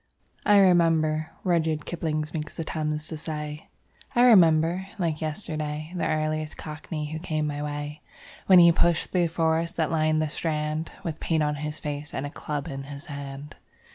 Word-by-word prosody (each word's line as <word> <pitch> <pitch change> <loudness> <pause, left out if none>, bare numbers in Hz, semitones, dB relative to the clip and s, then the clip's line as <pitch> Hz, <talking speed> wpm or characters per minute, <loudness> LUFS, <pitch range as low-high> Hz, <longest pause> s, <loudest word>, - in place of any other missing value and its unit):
'I 205 - +7
remember,' 160 -4 +3
Rudyard 160 -4 +1
Kipling 155 -3 -2
makes 155 -2 -5
the 165 - -2
Thames 155 -1 -3
to 160 - -5
say:... 150 -1 -5 0.5
I 240 - +5
remember, 175 -4 +5
like 165 -5 -1
yesterday, 155 -1 -3
The 175 - 0
earliest 155 0 -1
Cockney 150 0 -5
who 160 - -4
came 155 -2 -2
my 145 -1 -3
way, 145 0 -5 0.5
When 185 - +8
he 170 -1 +9
pushed 170 0 +1
through 175 -2 +2
the 165 - -12
forest 165 +1 +1
that 160 -2 +1
lined 155 -1 +2
the 155 - +1
Strand, 155 0 -2
With 160 -2 -4
paint 160 -2 +1
on 150 0 +1
his 150 +1 -4
face 150 0 -5
and 135 - -2
a 145 - -5
club 150 -2 -4
in 135 0 -5
his 140 +2 -8
hand. 140 +1 -8
155 Hz, 175 wpm, -26 LUFS, 150-165 Hz, 0.5 s, he